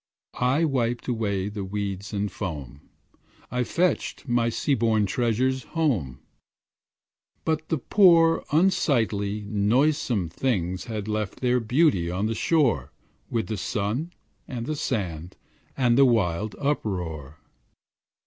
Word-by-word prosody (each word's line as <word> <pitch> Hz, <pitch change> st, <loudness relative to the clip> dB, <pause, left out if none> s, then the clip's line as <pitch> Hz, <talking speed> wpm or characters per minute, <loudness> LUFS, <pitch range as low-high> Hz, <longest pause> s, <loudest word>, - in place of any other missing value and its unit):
I 130 Hz, +6 st, +2 dB
wiped 120 Hz, -5 st, -1 dB
away 100 Hz, -5 st, -1 dB
the 105 Hz, -1 st, -5 dB
weeds 100 Hz, 0 st, -4 dB
and 100 Hz, -1 st, -2 dB
foam, 75 Hz, -, -6 dB, 0.7 s
I 125 Hz, 0 st, 0 dB
fetched 175 Hz, +1 st, -1 dB
my 120 Hz, -1 st, +2 dB
sea 140 Hz, +5 st, 0 dB
born 110 Hz, -4 st, +2 dB
treasures 125 Hz, +5 st, 0 dB, 0.2 s
home; 90 Hz, -, 0 dB, 1.2 s
But 160 Hz, -1 st, -1 dB
the 160 Hz, -, +1 dB
poor, 165 Hz, +1 st, +5 dB
unsightly, 120 Hz, -, +1 dB
noisome 110 Hz, -, +1 dB
things 95 Hz, -4 st, -1 dB
Had 110 Hz, -3 st, -5 dB
left 105 Hz, -2 st, -3 dB
their 125 Hz, 0 st, +2 dB
beauty 115 Hz, -, +2 dB
on 90 Hz, +4 st, -1 dB
the 110 Hz, -, 0 dB
shore 115 Hz, -, +1 dB, 0.4 s
With 115 Hz, -1 st, -1 dB
the 110 Hz, -, -4 dB
sun 105 Hz, -, -2 dB, 0.4 s
and 120 Hz, -2 st, -5 dB
the 155 Hz, -, -2 dB
sand 90 Hz, -, -3 dB, 0.4 s
and 125 Hz, -1 st, +3 dB
the 135 Hz, -, +8 dB
wild 105 Hz, -4 st, +1 dB
uproar. 90 Hz, -, -3 dB
115 Hz, 120 wpm, -25 LUFS, 100-135 Hz, 1.2 s, the